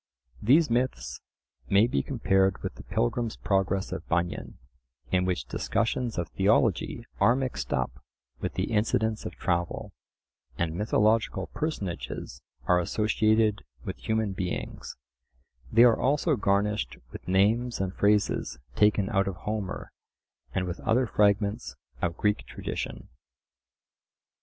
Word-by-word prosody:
These 145 +6 +4
myths 90 - -1 0.5
may 100 +3 +6
be 120 - +1
compared 95 -7 +1
with - - -3
the - - -11
Pilgrim's 110 - -1
Progress 95 -1 0
of - - -5
Bunyan, 85 +1 -1 0.5
in 90 0 +2
which 90 -9 -1
discussions 115 - -1
of 85 -2 -1
theology 110 +4 +1
are 120 - +5
mixed 130 -2 -3
up - - -2 0.4
with - - -4
the - - -1
incidents 110 0 +1
of - - -8
travel, 85 -2 -1 0.7
and 85 -2 -1
mythological 105 0 +1
personages 105 - -4 0.2
are 90 -1 +4
associated 110 +2 +2 0.2
with - - -4
human 110 -2 -1
beings: 95 -2 -4 0.8
they 115 +2 +7
are 120 -2 +6
also 145 +3 +2
garnished 105 -1 0
with - - -10
names 110 +6 +2
and 95 -1 -1
phrases 105 0 +1 0.2
taken 105 -2 +3
out 95 0 +2
of 95 - -2
Homer, 100 +3 -4 0.6
and 95 - -1
with 90 -1 -4
other 125 +3 +2
fragments 105 +1 +1 0.3
of 85 0 -1
Greek 105 -1 0
tradition. - - -5
105 Hz, 125 wpm, -28 LUFS, 95-115 Hz, 0.8 s, they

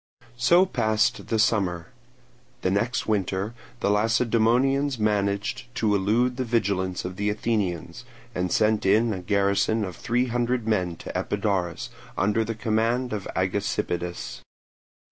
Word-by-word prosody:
So 170 +10 +5
passed 110 - +1
the 115 - 0
summer. 100 -4 +1 0.7
The 95 - +2
next 115 +6 0
winter 100 0 -1 0.3
the 100 - +2
Lacedaemonians 120 +5 +2
managed 105 +3 0
to 110 -4 +1
elude 115 +6 +2
the 130 - 0
vigilance 95 -7 0
of 90 0 -5
the 105 +1 0
Athenians, 105 -5 -2 0.3
and 90 -1 -2
sent 110 -1 +2
in 110 +4 +3
a 95 - -4
garrison 100 +3 +1
of 90 -3 -7
three 120 +7 0
hundred 120 -1 -1
men 90 -6 0
to - - -9
Epidaurus, 100 -5 -1 0.3
under 105 +3 +2
the 115 +1 -4
command 115 +2 0
of 105 -3 -4
Agesippidas. 95 -2 -2
105 Hz, 130 wpm, -25 LUFS, 100-115 Hz, 0.7 s, So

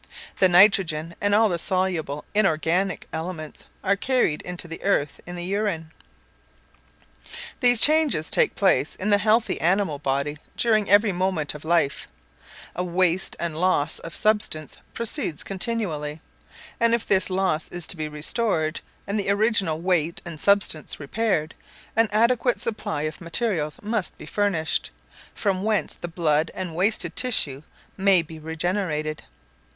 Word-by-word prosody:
The 185 - +5
nitrogen, 175 -4 +4
and 205 0 +2
all 220 +1 +5
the 175 -4 -2
soluble 175 -6 0
inorganic 185 -2 +1
elements 160 -2 -6 0.2
are 200 0 +2
carried 245 - 0 0.2
to 175 - -3
the 165 0 -8
earth 150 -7 0
in 175 - -7
the 175 0 -5
urine. 190 -5 -2 1.7
These 245 -2 +6
changes 300 - +3
take - - +2
place 190 -6 +2
in 205 +3 -2
the 205 - +5
healthy 220 -5 +1
animal 175 -3 +1
body 140 +2 -2 0.2
during 215 -3 +2
every 205 +1 +5
moment 180 -4 -1
of 150 - -10
life; 160 -3 0 0.7
a 180 - -1
waste 180 0 +1
and 170 -2 -3
loss 165 -4 +1
of 165 - -8
substance 210 -8 0 0.2
proceeds 205 -9 -1
continually; 180 -8 -2 0.6
and 230 -1 +4
if 235 - -4
this 190 -1 +1
loss 185 -4 0
is 175 -2 -4
to - - -1
be 155 -2 -4
restored, 155 +1 -1 0.2
and 205 +2 -2
the 200 - -1
original 200 -6 +1
weight 170 -2 0
and 165 -3 -8
substance 200 -5 +1
repaired, 165 0 -1 0.4
an 225 -1 +3
adequate 235 +3 +2
supply 210 -8 -2
of 155 +3 -5
materials 170 -3 -2
must 215 -2 -2
be - - -10
furnished, 195 -6 -1 0.5
from 195 -3 -1
whence 215 -1 0
the - - -7
blood 160 -2 +1
and 185 -3 -5
wasted 200 +5 +1
tissues 150 - +2 0.4
may 190 -3 +4
be 160 0 -11
regenerated. 160 -1 -2
185 Hz, 145 wpm, -24 LUFS, 155-205 Hz, 1.7 s, These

